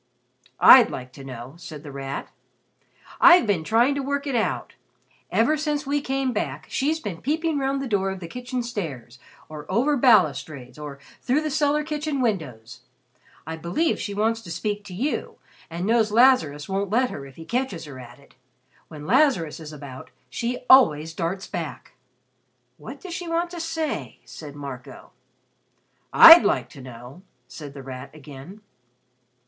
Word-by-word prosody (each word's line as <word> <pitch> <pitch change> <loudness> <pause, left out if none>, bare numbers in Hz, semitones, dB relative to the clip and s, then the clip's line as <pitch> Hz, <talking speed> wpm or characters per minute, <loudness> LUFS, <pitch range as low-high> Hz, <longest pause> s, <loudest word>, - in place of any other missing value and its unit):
"I'd 250 -4 +9
like 125 0 -8
to 135 - -11
know," 130 0 -9
said 155 -3 -10
The 145 - -9
Rat. 135 0 -6 0.9
"I've 350 -5 +7
been 195 -7 0
trying 235 - +3
to 280 - -2
work 280 +1 -2
it 280 - -3
out. 225 - -2 0.6
Ever 235 +8 +2
since 300 -1 -2
we 285 +1 0
came 270 -2 -1
back, 150 - -4
she's 310 +4 0
been 200 - -6
peeping 315 +2 -1
round 275 0 -1
the - - -4
door 195 -4 0
of 190 -1 -5
the 170 - -8
kitchen 250 +5 -5
stairs, 140 - -6 0.3
or 155 +2 -9
over 260 +9 +2
balustrades, 155 - +2
or 145 -2 -8 0.2
through 265 +4 +1
the 310 -1 -3
cellar 295 +1 +1
kitchen 300 -1 -3
windows. 130 - -3 0.6
I 160 +1 -6
believe 175 - -1
she 200 - -5
wants 225 +2 0
to 185 - -12
speak 205 +5 -3
to 185 - -9
you, 270 +10 -3 0.3
and 170 +2 -4
knows 220 0 +2
Lazarus 215 - +3
won't 195 0 -2
let 245 +4 +1
her 140 - -7
if 135 - -16
he 165 - -11
catches 235 -9 -3
her 140 -3 -10
at 120 -1 -12
it. 140 - -22 0.5
When 150 -2 -10
Lazarus 215 - +2
is 155 -1 -9
about, 140 -3 -10 0.2
she 245 +2 -4
always 160 - +5
darts 185 +3 -3
back." 165 -4 -7 0.8
"What 265 +5 -10
does 365 -2 -8
she 355 -1 -5
want 340 +1 -1
to 350 - -7
say?" 320 - -4
said 140 +4 -10
Marco. 140 -3 -9 1.0
"I'd 330 -5 +10
like 130 - 0
to 135 - -13
know," 125 +5 -11 0.3
said 140 +3 -10
The 140 - -9
Rat 130 0 -8
again. 150 +7 -12
195 Hz, 165 wpm, -24 LUFS, -, 1.0 s, I'd